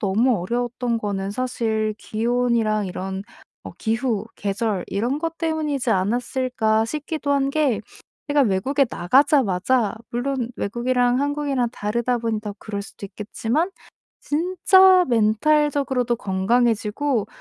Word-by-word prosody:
너무 220 +4 +2
어려웠던 240 +3 -2
거는 200 -2 -3
사실 220 -2 -1
기온이랑 230 -1 0
이런 190 +1 -5 0.4
어 - - -9
기후, 225 -2 -1
계절 205 -1 -2
이런 240 +8 -1
것 330 0 -4
때문이지 310 -5 -1
않았을까 225 +2 +1
싶기도 300 +3 -4
한 275 -1 +2
게 280 -6 +1 0.5
제가 290 -1 +3
외국에 260 +7 +2
나가자마자 235 - +2 0.2
물론 245 0 -2
외국이랑 245 +3 +1
한국이랑 285 -4 0
다르다 235 +4 -1
보니 225 -2 -2
더 210 -2 -6
그럴 205 -2 -5
수도 200 0 -11
있겠지만 230 - -2 0.5
진짜 370 +3 +4
멘탈적으로도 255 +2 +2
건강해지고 225 +4 0
240 Hz, 290 characters per minute, -22 LUFS, 215-275 Hz, 0.5 s, 진짜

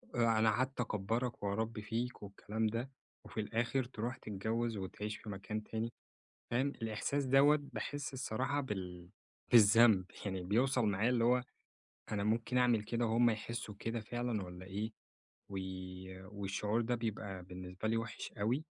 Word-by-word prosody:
أنا 115 -2 +4
قعدت 130 +4 0
أكبرك 115 +2 -1
وأربي 110 +2 -1
فيك 115 +3 -3
والكلام 105 +2 -2
ده 115 +5 -2 0.3
وفي - - -6
الآخر 115 +5 0
تروح 120 +1 -4
تتجوز 110 +1 -2
وتعيش 105 +2 -4
في 110 - -10
مكان 105 +2 -4
تاني، 115 +2 -3 0.6
فاهم؟ 125 +4 +3
الإحساس 115 +3 -1
دوّة 140 +3 +6
باحس 145 -2 -3
الصراحة 130 +2 0
بال 90 -7 -5 0.4
بالذنب، 110 -3 +8 0.2
يعني 95 -2 -2
بيوصل 125 +5 +3
معايا 105 +3 +2
اللي 120 -2 +3
هو 125 +1 +4 0.7
أنا 100 -1 0
ممكن 115 +3 +1
أعمل 120 -3 +4
كده 115 +2 0
وهُم 115 +1 +5
يحسوا 110 0 -4
كده 115 +2 -2
فعلًا 120 -1 -2
والّا 90 0 -8
إيه؟ 105 +4 -3 0.6
و 100 - -4 0.8
والشعور 105 +3 0
ده 120 +2 +1
بيبقى 100 -5 -3
بالنسبة 90 +3 -5
لي 115 - +2
وحش 115 -1 -4
أوي، 120 +10 0
115 Hz, 145 wpm, -35 LUFS, 105-120 Hz, 0.8 s, بالذنب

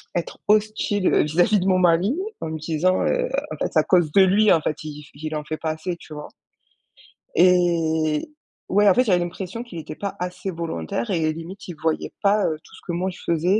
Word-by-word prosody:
à - - +3
être 170 - -7
hostile, 210 -2 +2
heu - - +4
vis-à-vis 175 +7 +2
de - - -2
mon 185 -1 +3
mari, 180 +5 +3 0.3
en 160 - -3
me 160 - -4
disant, 165 +4 +1
heu: - - +1 0.2
«En - - -4
fait - - -2
c'est - - +3
à - - +3
cause 175 -4 +3
de 195 - +6
lui, 200 +3 +5
en 165 - +5
fait 155 0 -3
iI 150 -1 -8
f 145 - -17
il 155 +2 -6
en 150 - -6
fait 155 - -3
pas 160 - -3
assez!» 160 +3 -4
tu 155 - -12
vois? 150 0 -7 1.1
Et 165 -4 +3 0.4
ouais, 205 +2 +5
en - - +6
fait, 250 - +4
j'avais 190 -7 +3
l'impression 180 +5 -5
qu'il 235 -8 -10
était 155 - -7
pas 200 +3 -4
assez 180 +2 -4
volontaire 165 - -3
et, 160 -4 +1
limite, 165 +5 -9
il 175 - -7
voyait 160 -1 -1
pas, 205 +1 +4
heu, 155 - -2
tout - - -19
ce - - -15
que - - -2
moi 180 +2 -1
je - - -13
faisais. 175 +5 +2
175 Hz, 235 wpm, -23 LUFS, 160-195 Hz, 1.1 s, de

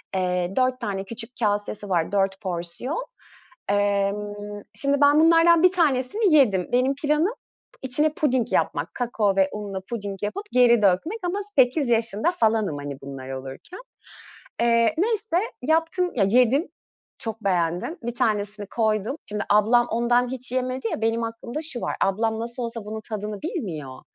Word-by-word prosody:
eee, 180 0 0
4 255 0 +1
tane 195 -1 -3
küçük 230 +2 -8
kasesi 205 -1 -1
var, 170 -1 0
4 195 0 0
porsiyon. 185 - -3 0.7
Imm, 205 +1 -1
şimdi, 280 +1 0
ben 290 +1 +6
bunlardan 335 +1 +5
1 365 - +7
tanesini 325 - +2
yedim. 200 -11 +3
Benim 255 +3 +2
planım 300 +8 +2 0.5
içine 295 +4 +1
puding 260 -6 0
yapmak, - - 0
kakao 220 -5 0
ve 190 0 +3
unla 200 -2 -5
puding 200 -4 -5
yapıp, 210 - -3
geri 240 -3 +5
dökmek 205 - +2
ama 390 +3 -2 0.2
8 260 +2 +3
yaşında 230 - +2
falanım, 220 - +1
hani, 145 -1 -6
bunlar 135 -1 -8
olurken. 135 - -8 0.8
Iıı, 235 - +3 0.3
neyse 430 0 0
yaptım 330 +4 +1
ya, 205 - +3
yedim, 250 - +3 0.5
çok 225 -1 -6
beğendim. 175 - 0
Bir 240 0 -4
tanesini 210 -3 -1
koydum. 220 +3 0
Şimdi 210 0 -2
ablam 225 +4 +4
ondan 240 +1 +2
hiç 255 -1 -5
yemedi 255 -1 -2
ya, - - -3
benim 225 +1 +1
aklımda 230 +5 -5
şu 280 -6 -3
var. - - -2
Ablam 220 +3 0
nasıl 235 +2 -4
olsa 230 -2 -5
bunun 220 +1 -5
tadını 210 -1 -5
bilmiyor. 165 - -5
230 Hz, 150 wpm, -24 LUFS, 200-265 Hz, 0.8 s, 1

